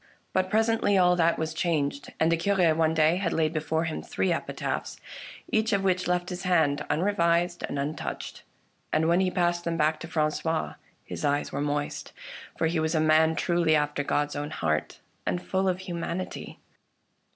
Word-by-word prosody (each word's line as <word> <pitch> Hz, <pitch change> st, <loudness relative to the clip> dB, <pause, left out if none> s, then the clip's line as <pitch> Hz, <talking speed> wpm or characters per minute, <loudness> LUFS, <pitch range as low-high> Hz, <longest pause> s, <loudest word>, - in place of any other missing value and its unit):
But 185 Hz, 0 st, +1 dB
presently 220 Hz, -2 st, +2 dB
all 180 Hz, -1 st, +5 dB
that 170 Hz, 0 st, +3 dB
was 160 Hz, 0 st, -2 dB
changed, 145 Hz, -4 st, -1 dB
and 160 Hz, +1 st, +3 dB
the -, -, +4 dB
Cure 175 Hz, -1 st, +2 dB
one 160 Hz, 0 st, +1 dB
day 160 Hz, +2 st, +4 dB
had 185 Hz, -3 st, -1 dB
laid 160 Hz, 0 st, +1 dB
before 160 Hz, +1 st, -1 dB
him 165 Hz, -2 st, -3 dB
three 185 Hz, -2 st, 0 dB
epitaphs, -, -, -4 dB, 0.5 s
each 220 Hz, 0 st, +2 dB
of 195 Hz, -1 st, +1 dB
which 185 Hz, -2 st, +1 dB
left 180 Hz, 0 st, 0 dB
his 180 Hz, -1 st, -5 dB
hand 160 Hz, -6 st, +2 dB
unre 200 Hz, +5 st, +1 dB
vised 170 Hz, 0 st, +2 dB
and -, -, -3 dB
untouched; 145 Hz, +2 st, -4 dB, 0.5 s
and 160 Hz, +1 st, +2 dB
when 170 Hz, +2 st, +4 dB
he 190 Hz, -1 st, +2 dB
passed 175 Hz, -1 st, 0 dB
them 170 Hz, -1 st, -2 dB
back 155 Hz, 0 st, +2 dB
to 165 Hz, -, -7 dB
Francois 160 Hz, 0 st, -1 dB, 0.3 s
his -, -, -6 dB
eyes 145 Hz, 0 st, 0 dB
were -, -, -2 dB
moist, 145 Hz, 0 st, -3 dB, 0.4 s
for -, -, +1 dB
he 165 Hz, 0 st, +1 dB
was 160 Hz, +1 st, 0 dB
a -, -, +3 dB
man 155 Hz, +1 st, +4 dB
truly 170 Hz, -2 st, +2 dB
after 150 Hz, -1 st, 0 dB
God's 145 Hz, +1 st, 0 dB
own 145 Hz, +1 st, -3 dB
heart, 75 Hz, -, -2 dB, 0.3 s
and 175 Hz, -, 0 dB
full 190 Hz, +1 st, 0 dB
of 185 Hz, 0 st, -2 dB
humanity. 175 Hz, 0 st, -5 dB
165 Hz, 185 wpm, -27 LUFS, 155-180 Hz, 0.5 s, all